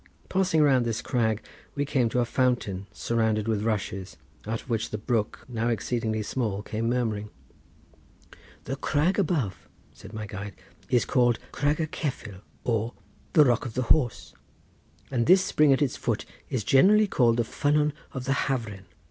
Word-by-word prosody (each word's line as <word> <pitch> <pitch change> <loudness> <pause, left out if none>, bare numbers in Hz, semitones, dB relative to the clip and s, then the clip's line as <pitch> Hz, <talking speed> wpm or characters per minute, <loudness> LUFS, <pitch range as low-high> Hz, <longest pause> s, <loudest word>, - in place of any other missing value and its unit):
Passing 185 -5 +2
round 135 -4 +4
this 115 -1 -1
crag 110 -3 0 0.3
we 145 0 0
came 130 -5 +1
to 125 - +1
a - - +1
fountain 115 -6 0
surrounded 110 -2 0
with 110 -2 0
rushes, 100 -4 -3 0.3
out 115 +1 -2
of - - -24
which 115 -3 -1
the 105 - -3
brook, 110 0 -2
now 115 -2 -2
exceedingly 115 -2 -1
small, 105 -4 -2
came 115 +2 -2
murmuring. 110 -4 -1 1.3
"The 135 - -4
crag 155 +8 +1
above," 145 - -1 0.2
said 100 - -12
my 110 -1 -5
guide, 100 -1 -7 0.3
"is 125 - +3
called 120 -3 +3
Crag 145 +2 +1
y 160 - +1
Cefyl, 125 - -5 0.2
or 115 0 0 0.4
the 150 - +7
Rock 120 -3 +2
of 110 - -9
the 130 -2 -1
Horse, 130 -8 -2 0.8
and 120 -3 0
this 185 +2 +6
spring 150 -5 +4
at 135 +2 +4
its 135 - -1
foot - - -2 0.2
is 120 -5 -1
generally 205 - +5
called 120 - +2
the 120 - +2
ffynnon 150 +5 +1 0.2
of 130 -2 -5
the 135 - +2
Hafren. 115 -8 -3
120 Hz, 165 wpm, -27 LUFS, 110-140 Hz, 1.3 s, the